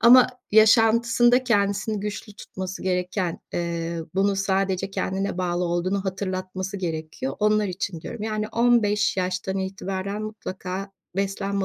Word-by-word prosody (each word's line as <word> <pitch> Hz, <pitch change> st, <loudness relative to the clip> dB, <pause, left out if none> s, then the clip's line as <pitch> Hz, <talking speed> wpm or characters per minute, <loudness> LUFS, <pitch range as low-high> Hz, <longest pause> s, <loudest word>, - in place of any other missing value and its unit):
ama 245 Hz, +2 st, +8 dB, 0.2 s
yaşantısında 230 Hz, +3 st, +5 dB
kendisini 205 Hz, -2 st, +1 dB
güçlü 210 Hz, +1 st, -5 dB
tutması 190 Hz, -1 st, -6 dB
gereken, 180 Hz, -1 st, -1 dB
eee, 170 Hz, -1 st, -2 dB, 0.2 s
bunu 195 Hz, +1 st, +2 dB
sadece 195 Hz, 0 st, 0 dB
kendine 195 Hz, 0 st, -2 dB
bağlı 180 Hz, 0 st, 0 dB
olduğunu 185 Hz, +3 st, 0 dB
hatırlatması 185 Hz, 0 st, -3 dB
gerekiyor, 165 Hz, +7 st, -4 dB
onlar 210 Hz, 0 st, +3 dB
için 180 Hz, -2 st, -4 dB
diyorum. 230 Hz, +6 st, -7 dB
Yani, 215 Hz, -1 st, -2 dB
15 225 Hz, -4 st, +3 dB
yaştan 185 Hz, +1 st, -1 dB
itibaren 195 Hz, +1 st, -3 dB
mutlaka 195 Hz, -2 st, -5 dB, 0.2 s
beslenme 195 Hz, 0 st, -1 dB
195 Hz, 120 wpm, -24 LUFS, 185-210 Hz, 0.2 s, ama